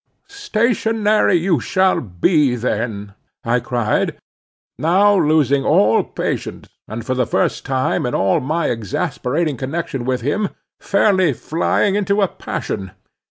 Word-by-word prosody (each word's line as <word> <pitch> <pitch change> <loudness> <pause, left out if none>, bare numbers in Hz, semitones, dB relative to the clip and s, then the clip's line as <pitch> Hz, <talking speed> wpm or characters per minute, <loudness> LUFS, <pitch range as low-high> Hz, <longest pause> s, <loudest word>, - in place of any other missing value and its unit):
"Stationary 225 - +1
you 175 0 +2
shall 190 0 +1
be 125 - +1
then," 110 -4 -3 0.3
I 120 +2 +1
cried, 120 -2 -1 0.6
now 195 +6 +4
losing 150 -5 +2
all 110 +2 +3
patience, - - -4 0.2
and 115 +1 -6
for 130 - -1
the 125 -2 0
first - - -1
time 130 -1 0
in 125 - -2
all 95 0 +2
my 155 +5 -1
exasperating 135 - -2
connection 135 -1 -4
with 130 0 -1
him 190 - -1 0.3
fairly 190 -6 +2
flying 165 - 0
into 200 0 +1
a - - +3
passion. 95 - -5
145 Hz, 125 wpm, -19 LUFS, 120-190 Hz, 0.6 s, now